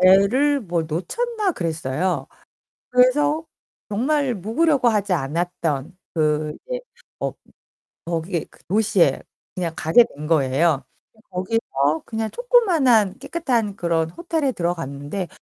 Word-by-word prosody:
배를 215 +11 +5
뭐 175 -5 -1
놓쳤나 395 - -2
그랬어요. 160 - -2 0.6
그래서 290 +5 +3 0.4
정말 270 +5 +1
묵으려고 250 - +2
하지 205 -4 +2
않았던 160 0 -2 0.2
그 150 -1 0
이제 - - -2 0.4
어 - - -1 0.7
거기에 170 +1 -2
그 - - -22
도시에 205 -1 +3 0.3
그냥 170 -3 -2
가게 165 +11 +5
된 150 +1 -6
거예요. 150 0 +2 0.3
근데 220 - -25
거기서 180 -7 0
그냥 220 -1 -3
조그마한 325 - +3
깨끗한 240 -11 -1
그런 165 -3 0
호텔에 320 - -1
들어갔는데 170 - -3
190 Hz, 260 characters per minute, -22 LUFS, 160-255 Hz, 0.7 s, 배를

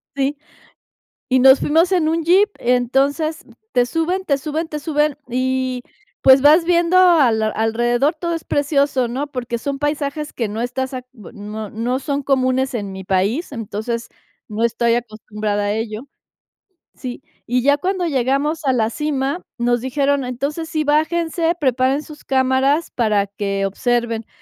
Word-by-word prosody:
Sí. 280 +1 -1 0.9
Y 260 0 +3
nos 265 +1 +7
fuimos 330 +5 +2
en 350 -4 +2
un 325 +1 0
Jeep. 380 +6 +4
Entonces, 270 +6 +1 0.3
te 245 -1 +3
suben, 330 +7 -1
te 285 -7 +1
suben, 310 +3 -3
te 300 - -4
suben, 295 -1 0
y, 255 0 -1 0.4
pues, 265 0 +7
vas 305 +4 +6
viendo 345 +1 +3
a 340 -9 +6
la 220 0 0
alrededor 240 +7 +1
todo 340 +1 -3
es 330 - -4
precioso, 280 -3 +1
¿no?, 270 +5 -3
porque 245 -4 -4
son 275 +3 -4
paisajes 295 0 -2
que 230 - -2
no 215 +2 -4
estás 260 +2 -3
a 255 -1 -5
bue 225 -6 -13
no 210 0 -7
no 240 +5 -2
son 280 0 -2
comunes 260 -1 +1
en 200 -4 -4
mi 190 0 -7
país, 195 - 0
entonces, 230 0 -4 0.4
no 215 +2 -3
estoy 235 0 +2
acostumbrada 215 -3 -3
a 205 - 0
ello. 220 +3 -4 0.9
Sí, 255 0 -7 0.2
y 250 +1 +1
ya 285 +2 +4
cuando 370 +3 -1
llegamos 280 +3 0
a 265 - +3
la 225 -3 +1
cima 285 +3 -2 0.2
nos 240 0 +1
dijeron: 275 +2 0
"Entonces 280 +6 -3
sí, 310 -1 -1
bájense, 325 +2 +1
preparen 265 0 +1
sus 305 -1 -13
cámaras 265 +4 +1
para 215 -4 +1
que 200 0 -3
observen", 230 +2 -1
265 Hz, 160 wpm, -19 LUFS, 235-300 Hz, 0.9 s, nos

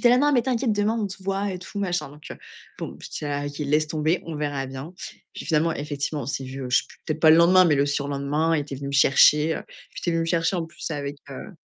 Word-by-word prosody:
était 245 - +5
là: 250 - +5
«Non, 290 +2 +3
mais 245 -3 +3
t'inquiète, 245 -2 0
demain 210 +2 +1
on 210 -2 -1
se 190 0 -9
voit 195 +1 -1
et 185 - -5
tout 185 +3 -8
machin». 180 -5 -1
Donc 150 +1 -16 0.5
bon, - - -6
je - - -9
dis: - - -5
«Ah 145 0 -2
OK, 145 0 -7
laisse 150 +1 +1
tomber, 155 +3 0
on 165 -2 -5
verra 145 -2 -2
bien». 135 +6 -8 0.4
Puis - - -7
finalement, 165 0 +2
effectivement, 145 0 -3
on - - -7
s'est 135 0 -3
vus, 130 +1 -7
heu, 125 - -5
je 130 - +5
sais - - -2
plus, - - -17
peut-être 155 0 -2
pas 160 - +7
le 160 - +8
lendemain, 180 +2 +6
mais 160 -4 +4
le 140 0 +2
surlendemain, 145 +3 0
il - - 0
était 140 -2 -6
venu 140 +1 -6
me 140 - -5
chercher, 150 +2 +5 0.5
il - - -8
était 175 - -1
venu 165 - +1
me - - 0
chercher 165 +2 +1
en 170 - -1
plus 165 +1 -7
avec, 145 -2 -4
heu, 135 +10 -8
155 Hz, 280 wpm, -24 LUFS, 145-180 Hz, 0.5 s, le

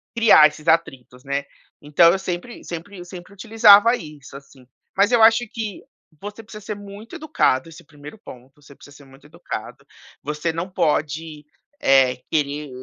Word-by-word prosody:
criar 225 -10 +6
esses 150 0 -13
atritos, 135 -6 -2
né. 140 +1 -2 0.4
Então 150 +3 +4
eu 190 - -2
sempre 185 +5 -7
sempre 175 +3 -9
eu 175 - -10
sempre 180 +2 -12
utilizava 220 +1 +5
isso, 150 - -12
assim. 135 -2 -18 0.3
Mas 200 +4 +3
eu 240 -2 +3
acho 225 +2 +5
que 215 -4 -6 0.4
você 205 +2 -9
precisa 215 -1 -13
ser 210 - -5
muito 205 +2 -11
educado, 165 - 0
esse 165 +1 -14
primeiro 150 +3 -14
ponto, 135 - -15
você 140 - -17
precisa 145 +1 -17
ser 145 - -17
muito 135 +2 -20
educado, - - -9 0.4
você 150 +3 -3
não 170 +3 -5
pode, 155 -2 -2 0.4
eh, 130 -2 +3
querer 150 -1 -2
165 Hz, 165 wpm, -21 LUFS, 145-205 Hz, 0.4 s, criar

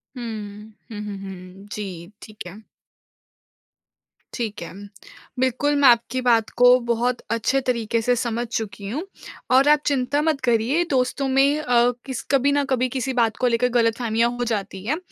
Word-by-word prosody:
हुँ। 215 -3 -7 0.2
हुँ, 210 - -6
हुँ, 205 -1 -6
हुँ। 190 0 -10
जी, 185 -3 -7
ठीक 215 -3 -10
है। 180 - -10 1.8
ठीक 225 -6 -4
है। 170 - -7 0.7
बिल्कुल 260 +3 +1
मैं 285 -2 +5
आपकी 240 +2 +2
बात 230 -3 +2
को 245 +1 +7
बहुत 240 +1 -1
अच्छे 230 +4 +1
तरीक़े 230 -2 0
से 245 +2 +2
समझ 235 0 -2
चुकी 205 -3 -5
हूँ 285 +10 -3 0.5
और 265 +2 +5
आप 300 0 +5
चिंता 280 +1 +1
मत 310 -2 0
करिए 245 +6 +2
दोस्तों 265 +1 0
में 275 +3 +3
अ, 245 -4 +3
किस 260 -3 -4
कभी 275 +1 +3
न 285 0 +2
कभी 255 -1 +1
किसी 260 +1 -3
बात 230 -3 +1
को 250 - +1
लेकर 245 +1 +2
ग़लतफ़हमियाँ 230 -1 +1
हो 245 - 0
जाती 200 -4 -3
है, 290 +7 0
240 Hz, 165 wpm, -22 LUFS, 220-260 Hz, 1.8 s, को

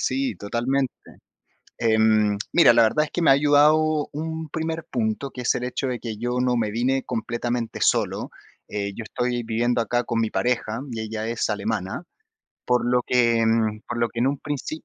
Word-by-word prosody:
sí, 270 -1 0
totalmente. 125 +5 -1 0.9
Em, 110 -2 +3
mira, 170 -8 +6
la 115 - +5
verdad 150 +8 +2
es - - -13
que 175 - -2
me - - +4
ha - - +9
ayudado 150 +2 +3
un 160 +1 -5
primer 160 +1 -3
punto, 120 +3 -1
que 125 - -7
es 120 - +1
el 125 - -3
hecho 125 +2 -2
de 125 -2 -3
que 110 -3 -6
yo 120 +2 -2
no 125 -1 +1
me 110 -2 0
vine 130 +4 0
completamente 120 +1 -3
solo. - - +1 0.4
Eh, 100 -1 -3
yo 115 - -6
estoy 120 +2 -2
viviendo 120 +2 0
acá 120 +1 0
con 115 0 -2
mi 110 -1 +1
pareja 120 -1 -1
y 115 - -4
ella 110 0 -4
es 115 -1 -1
alemana, 105 - -2 0.6
por 125 -1 +1
lo 125 0 +2
que 120 -2 +3 0.4
por 120 - -3
lo 120 0 +1
que 115 - -5
en 125 - +3
un 140 0 -2
princi 145 +2 -5
120 Hz, 190 wpm, -24 LUFS, 115-140 Hz, 0.9 s, ha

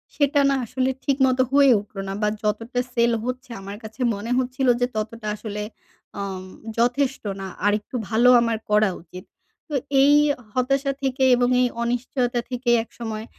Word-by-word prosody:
সেটা 285 0 +3
না 275 - +2
আসলে 260 +3 -1
ঠিক 275 -1 +1
মত 255 0 0
হয়ে 280 -1 +6
উঠল 205 0 -13
না। 195 - -3
বা 210 - +2 0.2
যতটা 225 +4 -1
সেল 235 0 +3
হচ্ছে 255 0 -5
আমার 200 +1 -7
কাছে 220 +3 -9
মনে 215 +4 -5
হচ্ছিল 260 +1 -1
যে - - +4
ততটা 215 +1 -4
আসলে 210 -1 -5 0.6
অম 190 -2 -4 0.3
যথেষ্ট 255 +3 +1 0.2
না। 190 - -5 0.2
আরেকটু 210 +4 0
ভালো 235 +2 +4
আমার 230 -1 0
করা 210 0 +4
উচিত। 180 +2 -12 0.4
তো - - -7 0.3
এই 285 +1 +6 0.4
হতাশা 275 +2 +1
থেকে 265 0 0
এবং 245 0 +2
এই 250 - +4 0.2
অনিশ্চয়তা 245 +1 -1
থেকে 250 0 -2
একসময় 225 -1 -7
240 Hz, 160 wpm, -23 LUFS, 215-260 Hz, 0.6 s, হয়ে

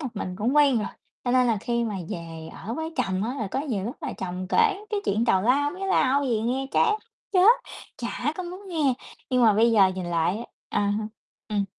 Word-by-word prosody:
một 275 - -3
mình 185 -3 -4
cũng 245 +7 +1
quen 280 -5 +5
rồi. 210 - -2 0.4
Cho 245 - 0
nên 250 0 +4
là 225 -2 +2
khi 235 -1 0
mà 215 -3 -3 0.2
về 165 -1 -6
ở 225 +4 -6
với 320 +2 -4
chồng 190 +2 0
á, 245 +4 -2
là 215 -3 -2
có 270 - -1
nhiều 225 -10 -2
lúc 240 +6 -4
là - - -3
chồng 185 0 -5
kể 420 - +2
cái 415 -2 0
chuyện 215 +4 +1
tào 190 -5 +3
lao 280 +5 +3
mía 385 +3 -5
lau 280 -7 +3
gì 230 -4 +1
nghe 255 +4 -1
chán 425 - +3 0.4
chết, 375 +2 +6 0.5
chả 245 +4 -2
có 370 - -3
muốn 365 +3 -8
nghe. 300 -7 +1 0.4
Nhưng 250 -1 +3
mà 220 -2 +7
bây 230 +3 +4
giờ 200 -4 +6
nhìn 185 -2 -4
lại 170 +2 +1
á 235 - -6 0.2
à 205 - 0
ha, 215 - -3 0.4
ừm. 205 -2 0
235 Hz, 235 wpm, -25 LUFS, 205-290 Hz, 0.5 s, mà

